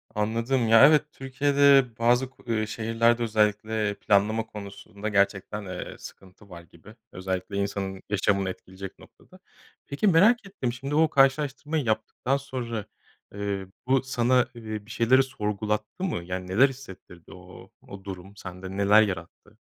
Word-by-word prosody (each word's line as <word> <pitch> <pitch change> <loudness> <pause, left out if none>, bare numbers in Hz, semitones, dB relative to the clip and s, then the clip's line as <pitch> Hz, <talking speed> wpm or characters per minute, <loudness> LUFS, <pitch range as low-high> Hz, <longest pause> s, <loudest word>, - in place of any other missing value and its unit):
Anladım. 115 +4 0
Ya, 115 +5 +8
evet, 150 -1 +4
Türkiye'de 140 0 +3
bazı, 120 +2 +2
ku 130 - -23
eee, 110 -2 0
şehirlerde 115 +2 +1
özellikle 105 -1 0
planlama 105 +3 +1
konusunda 100 0 -8
gerçekten, 100 +1 0
eee, 90 -1 -7
sıkıntı 95 +2 -14
var 85 -1 -10
gibi. 85 +5 -17 0.2
Özellikle 95 +1 -4
insanın 100 -1 -3
yaşamını 100 -1 +1
etkileyecek 95 +1 -9
noktada. - - -19 0.5
Peki, 145 +9 -1
merak 205 +7 +5
ettim, 130 -12 -4
şimdi 135 +3 -4
o 160 0 +4
karşılaştırmayı 145 +2 +1
yaptıktan 110 +5 -1
sonra, 120 -6 -5 0.5
eee, 100 -1 -4 0.2
bu 130 0 +3
sana, 125 -1 +2
eee, 110 -3 -7
bir 115 - -12
şeyleri 125 +3 +4
sorgulattı 105 - -3
mı? 155 - -2
Yani, 90 +1 -5
neler 120 +9 +4
hissettirdi? 95 -10 -13
O - - -14 0.2
o 100 -1 -10
durum 95 +1 -9
sende 95 0 -8
neler 100 +2 +6
yarattı? 90 -6 -5
110 Hz, 140 wpm, -26 LUFS, 100-130 Hz, 0.5 s, Ya